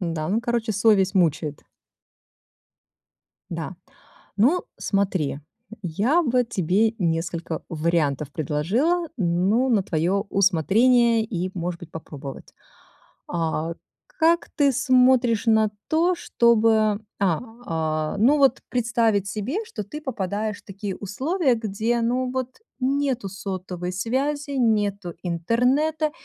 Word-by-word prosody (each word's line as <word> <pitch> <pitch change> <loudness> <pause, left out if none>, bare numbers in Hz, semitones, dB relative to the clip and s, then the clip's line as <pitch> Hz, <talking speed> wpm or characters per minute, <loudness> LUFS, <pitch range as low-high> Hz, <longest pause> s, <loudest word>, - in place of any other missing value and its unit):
Да, 165 -4 -2
ну, 210 +5 +1
короче, 235 -2 -1
совесть 205 -2 +3
мучает. 155 -5 +1 1.9
Да. 170 +2 -5 0.6
Ну, 275 - +3 0.2
смотри, 190 -8 -1 0.4
я 210 - +1
бы 250 -4 +2
тебе 210 0 +1
несколько 165 -2 -2
вариантов 155 -3 0
предложила, 215 - 0
ну, 195 +6 +1
на 220 -5 +3
твоё 185 +4 0
усмотрение 220 +6 +3
и, 185 -4 -3
может 175 -1 -4
быть, 170 - -11
попробовать. 145 -4 -9 0.7
А, 165 -1 -2 0.3
как 340 -8 +1
ты 285 -3 +4
смотришь 255 -3 +3
на 220 -1 +4 0.2
то, 340 +3 +2
чтобы, 220 -7 +3 0.2
а, 180 -6 +2 0.3
а, 155 -1 -1
ну, 270 +8 +4
вот 270 -2 +3
представить 230 -4 +1
себе, 250 - -3
что 215 - -6
ты 300 +9 -8
попадаешь 215 - -3
в - - -51
такие 195 -1 -6
условия, 265 - 0
где, 225 +2 -1
ну, 250 +2 0
вот 260 - -4 0.2
нету 265 -4 0
сотовой 185 -2 -5
связи, 275 +9 -2
нету 205 -8 0
интернета 250 - +1
210 Hz, 110 wpm, -24 LUFS, 175-255 Hz, 1.9 s, ты